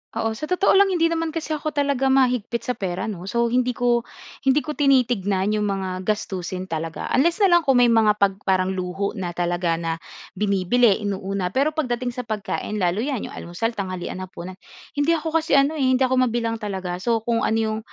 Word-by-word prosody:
Oo, 225 Hz, -, 0 dB
sa 225 Hz, +8 st, -5 dB
totoo 365 Hz, +3 st, +3 dB
lang 400 Hz, 0 st, +6 dB
hindi 335 Hz, -3 st, +2 dB
naman 330 Hz, -1 st, -2 dB
kasi 325 Hz, -1 st, -4 dB
ako 310 Hz, 0 st, -3 dB
talaga 280 Hz, -2 st, +1 dB
mahigpit 250 Hz, -3 st, +1 dB
sa -, -, -1 dB
pera 190 Hz, -2 st, -3 dB
'no. 185 Hz, -2 st, -8 dB
So 235 Hz, +2 st, 0 dB
hindi 250 Hz, 0 st, +1 dB
ko 240 Hz, -1 st, +1 dB, 0.3 s
hindi 270 Hz, +2 st, +2 dB
ko 305 Hz, -, -4 dB
tinitignan 240 Hz, -9 st, +2 dB
'yong 210 Hz, -1 st, 0 dB
mga 195 Hz, -1 st, -2 dB, 0.2 s
gastusin 185 Hz, -3 st, -2 dB
talaga 165 Hz, -2 st, -5 dB
unless 335 Hz, +9 st, +2 dB
na 385 Hz, -, +5 dB
lang 345 Hz, 0 st, +6 dB
kung 270 Hz, -, +5 dB
may 245 Hz, -1 st, +5 dB
mga 220 Hz, -2 st, +4 dB
'pag 200 Hz, -2 st, +1 dB
parang 185 Hz, 0 st, +2 dB
luho 190 Hz, +2 st, -2 dB
na 175 Hz, -2 st, -4 dB
talaga 175 Hz, -1 st, 0 dB
na 165 Hz, 0 st, -3 dB, 0.3 s
binibili, 205 Hz, +2 st, +2 dB
inuuna. 195 Hz, -2 st, -2 dB
Pero 285 Hz, +7 st, +1 dB
pagdating 245 Hz, -5 st, -2 dB
sa 250 Hz, -, -4 dB
pagkain 215 Hz, -1 st, -3 dB
lalo 185 Hz, +4 st, +1 dB
yan 265 Hz, -5 st, -2 dB
'yong -, -, -10 dB
almusal, 225 Hz, +7 st, -3 dB
tanghalian, 185 Hz, -2 st, -4 dB
hapunan, 185 Hz, 0 st, -8 dB, 0.4 s
hindi 290 Hz, +3 st, +2 dB
ako 325 Hz, -1 st, -1 dB
kasi 290 Hz, -4 st, +4 dB
ano 280 Hz, +3 st, +1 dB
eh, 290 Hz, -, -1 dB
hindi 255 Hz, -, +2 dB
ako 260 Hz, -1 st, +2 dB
mabilang 230 Hz, -2 st, -1 dB
talaga. 190 Hz, -5 st, -4 dB
So 230 Hz, -1 st, +2 dB
kung 230 Hz, +1 st, -1 dB
ano 220 Hz, 0 st, +1 dB
'yong 220 Hz, -1 st, -1 dB
225 Hz, 200 wpm, -23 LUFS, 190-265 Hz, 0.4 s, lang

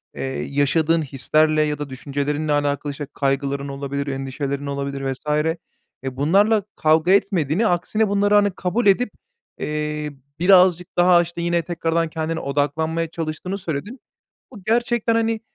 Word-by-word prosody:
eee, -, -, -4 dB, 0.2 s
yaşadığın 155 Hz, +3 st, +1 dB
hislerle 155 Hz, +3 st, +1 dB
ya 150 Hz, -1 st, 0 dB
da 145 Hz, -2 st, -5 dB
düşüncelerinle 145 Hz, +3 st, -2 dB
alakalı, 145 Hz, 0 st, 0 dB
işte 140 Hz, 0 st, -6 dB
kaygıların 140 Hz, 0 st, -1 dB
olabilir, 140 Hz, +1 st, -4 dB
endişelerin 135 Hz, +1 st, -3 dB
olabilir 140 Hz, 0 st, -3 dB
vs. 130 Hz, -, -6 dB, 0.8 s
Eee, 130 Hz, -1 st, -5 dB
bunlarla 200 Hz, +8 st, +3 dB
kavga 160 Hz, +3 st, +3 dB
etmediğini 195 Hz, 0 st, +2 dB
aksine 205 Hz, +5 st, +1 dB
bunları 205 Hz, +1 st, +2 dB
hani 205 Hz, -1 st, +4 dB
kabul 185 Hz, +6 st, -1 dB
edip, 245 Hz, +6 st, +4 dB, 0.5 s
eee, 150 Hz, 0 st, -3 dB, 0.3 s
birazcık 180 Hz, -1 st, +4 dB
daha 175 Hz, 0 st, +5 dB
aşta 170 Hz, 0 st, +1 dB
yine 170 Hz, 0 st, +1 dB
tekrardan 165 Hz, -1 st, -1 dB
kendine 160 Hz, +1 st, -3 dB
odaklanmaya 160 Hz, +4 st, -1 dB
çalıştığını 165 Hz, +4 st, -4 dB
söyledin. 185 Hz, -, -5 dB, 0.5 s
Bu 205 Hz, -5 st, -11 dB
gerçekten 235 Hz, +1 st, +1 dB
hani, 225 Hz, -1 st, +1 dB
160 Hz, 135 wpm, -22 LUFS, 140-185 Hz, 0.8 s, daha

